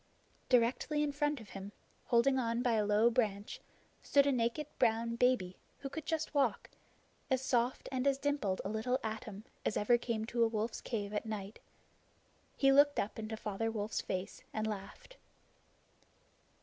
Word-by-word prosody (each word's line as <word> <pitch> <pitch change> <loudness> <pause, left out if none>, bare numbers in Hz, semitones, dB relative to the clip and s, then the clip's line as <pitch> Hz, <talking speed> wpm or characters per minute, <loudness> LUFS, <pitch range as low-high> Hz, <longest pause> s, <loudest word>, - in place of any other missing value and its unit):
Directly 255 +5 +2
in 295 - 0
front 295 0 0
of 220 -3 -12
him, 195 +1 -8 0.3
holding 260 +2 +3
on 230 0 0
by 245 - +2
a 210 -2 +2
low 215 +3 +4
branch, 210 -4 -1 0.4
stood 280 -1 +4
a 285 - +3
naked 245 +4 0
brown 230 +1 +2
baby 235 -7 +2 0.2
who 275 - -6
could 315 +2 -7
just 320 -1 -1
walk 270 -8 +1 0.6
as 260 -2 +2
soft 245 -1 0
and 260 +1 0
as 275 -1 +3
dimpled 275 -10 -1
a - - -1
little 220 +4 0
atom 215 -2 -5 0.2
as - - 0
ever 240 +3 +3
came 225 -2 -2
to 235 +1 +1
a - - +5
wolf's 225 +1 -2
cave 210 -3 -3
at 210 +2 -2
night. 210 -1 -5 1.0
He 270 -1 +5
looked 285 +1 +5
up 205 +2 -2
into 220 0 -4
Father 215 +2 -2
Wolf's 215 -1 -2
face, 190 +2 -4
and 215 0 -2
laughed. 215 - -7
230 Hz, 165 wpm, -34 LUFS, 215-265 Hz, 1.0 s, a